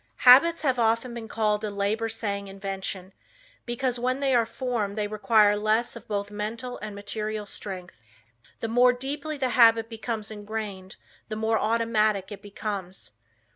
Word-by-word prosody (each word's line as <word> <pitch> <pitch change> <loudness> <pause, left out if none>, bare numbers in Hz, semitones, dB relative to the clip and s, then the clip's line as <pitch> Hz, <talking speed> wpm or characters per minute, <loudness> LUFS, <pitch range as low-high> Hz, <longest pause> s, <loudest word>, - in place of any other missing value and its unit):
Habits 310 +7 +8
have 260 -4 +1
often 230 +2 +1
been 230 -2 -7
called 210 -1 0
a 215 - -1
labor 205 +3 -1
saving 200 -3 -3
invention, 195 -1 -5 0.5
because 240 0 -1
when 255 +2 0
they 275 -2 +1
are 235 -2 +3
formed 225 -5 -3
they 210 - 0
require 210 0 +4
less 215 +4 +1
of 235 - -11
both 205 -1 -3
mental 225 +4 -5
and 210 -1 -7
material 210 +1 -4
strength. 185 - -7 0.6
The 225 - -1
more 245 +2 +5
deeply 285 +4 -4
the 260 -2 0
habit 230 -2 +5
becomes 220 -1 -4
ingrained 205 -3 -6 0.3
the 215 - -3
more 220 +1 +1
automatic 215 -3 +1
it 205 - -8
becomes. 200 -2 -6
220 Hz, 155 wpm, -26 LUFS, 205-240 Hz, 0.6 s, Habits